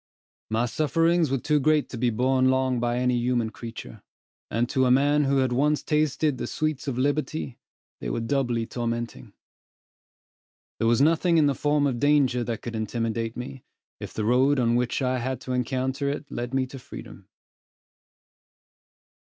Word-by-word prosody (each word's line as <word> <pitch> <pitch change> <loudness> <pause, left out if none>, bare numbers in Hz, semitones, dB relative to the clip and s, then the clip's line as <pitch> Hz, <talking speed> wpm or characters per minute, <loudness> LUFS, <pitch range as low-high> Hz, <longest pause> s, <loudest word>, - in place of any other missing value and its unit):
My 110 +2 +1
sufferings 165 +5 +2
were 135 - +1
too 150 +3 +1
great 155 +1 +2
to 125 - -6
be 125 0 +2
borne 130 +3 +2
long 130 -1 +1
by 120 0 0
any 125 0 +1
human 120 -2 0
creature; 115 -2 -9 0.5
and 115 +2 0
to 130 0 +1
a - - +3
man 145 +3 +4
who 135 0 +2
had 130 -2 +2
once 150 +4 +1
tasted 150 -1 +1
the - - -3
sweets 155 -2 -2
of 130 -3 -2
liberty, 145 -1 -1 0.4
they - - -4
were - - -1
doubly 120 -1 0
tormenting. 120 0 -4 1.5
There 115 - +1
was 115 +2 +3
nothing 165 +3 +3
in 155 - +5
the 140 - +3
form 145 +1 +1
of 130 -4 -1
danger 140 -4 +3
that 115 -2 -4
could 115 -1 -5
intimidate 115 +1 -2
me, 130 +1 -7 0.4
if - - -7
the 110 - -3
road 130 +5 +3
on 120 -1 +2
which 125 +2 0
I 130 0 0
had 130 +1 -3
to 130 - -6
encounter 130 +2 -1
it 145 +1 -5
led 120 0 -4
me 130 -1 +2
to 135 +1 -10
freedom. - - -11
130 Hz, 170 wpm, -25 LUFS, 120-145 Hz, 1.5 s, in